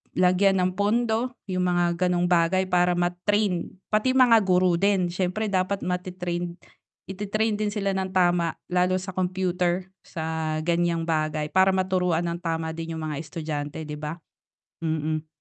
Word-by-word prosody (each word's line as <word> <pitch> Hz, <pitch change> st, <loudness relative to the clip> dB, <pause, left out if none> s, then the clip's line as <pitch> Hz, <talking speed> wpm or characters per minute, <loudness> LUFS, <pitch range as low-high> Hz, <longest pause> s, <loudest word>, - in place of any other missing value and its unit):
lagyan 185 Hz, +1 st, +3 dB
ng 180 Hz, 0 st, +1 dB
pondo 230 Hz, +4 st, +1 dB
yung 185 Hz, 0 st, 0 dB
mga 175 Hz, 0 st, +1 dB
ganong 175 Hz, 0 st, +1 dB
bagay 175 Hz, +2 st, +3 dB
para 180 Hz, -1 st, +3 dB
ma-train, 180 Hz, +2 st, 0 dB, 0.2 s
pati 215 Hz, +5 st, +2 dB
mga 245 Hz, -3 st, +7 dB
guro 180 Hz, -2 st, +3 dB
din 195 Hz, -3 st, +2 dB
siyempre 185 Hz, +4 st, -1 dB
dapat 190 Hz, +1 st, 0 dB
mate-train, 180 Hz, -1 st, -3 dB, 0.6 s
i-te-train 210 Hz, +2 st, -1 dB
din 210 Hz, -1 st, -1 dB
sila 200 Hz, -2 st, -1 dB
ng 190 Hz, 0 st, -3 dB
tama, 175 Hz, -2 st, +2 dB, 0.2 s
lalo 180 Hz, +1 st, +2 dB
sa 190 Hz, -, -7 dB
computer, 185 Hz, 0 st, -1 dB, 0.2 s
sa 160 Hz, -1 st, -3 dB
ganyang 170 Hz, 0 st, +1 dB
bagay 155 Hz, -2 st, -1 dB
para 190 Hz, 0 st, +4 dB
maturuan 180 Hz, -3 st, +1 dB
ng 170 Hz, -, -3 dB
tama 160 Hz, -1 st, -2 dB
din 165 Hz, 0 st, -5 dB
yung 160 Hz, -, -5 dB
mga 145 Hz, -, -3 dB
estudyante 155 Hz, -2 st, -5 dB
'di 150 Hz, -, -5 dB
ba? 155 Hz, +3 st, -6 dB, 0.6 s
Mm. 155 Hz, -1 st, -1 dB
180 Hz, 150 wpm, -25 LUFS, 170-190 Hz, 0.6 s, mga